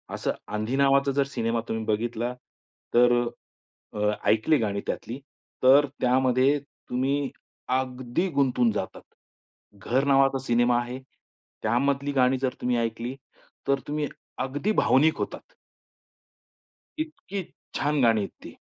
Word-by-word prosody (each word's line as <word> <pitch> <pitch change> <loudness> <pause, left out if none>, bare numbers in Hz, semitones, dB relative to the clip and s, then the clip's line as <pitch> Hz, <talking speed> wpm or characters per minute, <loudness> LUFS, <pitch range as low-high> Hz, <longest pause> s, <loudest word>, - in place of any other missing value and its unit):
असं - - -1 0.2
आंधी 110 +4 -1
नावाचा 140 0 +4
जर 140 - +4
सिनेमा 115 -3 -1
तुम्ही 110 0 -2
बघितला 115 +3 -1 0.6
तर 120 0 +6 0.8
अ, 105 - -5
अ, 105 0 +2 0.2
ऐकली 115 +8 +4
गाणी 100 -4 -1
त्यातली 120 +4 -4 0.4
तर 135 +3 +7 0.2
त्यामध्ये 130 +2 +3
तुम्ही 135 0 -2 0.5
अगदी 130 +6 -2
गुंतून 130 -6 +2
जातात. - - -4 0.7
घर 125 +7 0
नावाचा 135 -1 +4
सिनेमा 120 0 +3
आहे. 125 +2 -5 0.6
त्यामधली 140 +5 +1
गाणी 130 -1 +3
जर 130 -1 0
तुम्ही 125 -1 +1
ऐकली 115 +2 -2 0.5
तर 140 0 +2
तुम्ही 150 0 -1 0.3
अगदी 145 +11 -1
भावनिक 155 -1 +4
होतात. - - -5 1.5
इतकी 310 - -4 0.3
छान! 145 -1 +1
गाणी 115 -2 +4
आहेत 100 - -3
ती. - - -10
130 Hz, 120 wpm, -26 LUFS, 120-140 Hz, 1.5 s, तर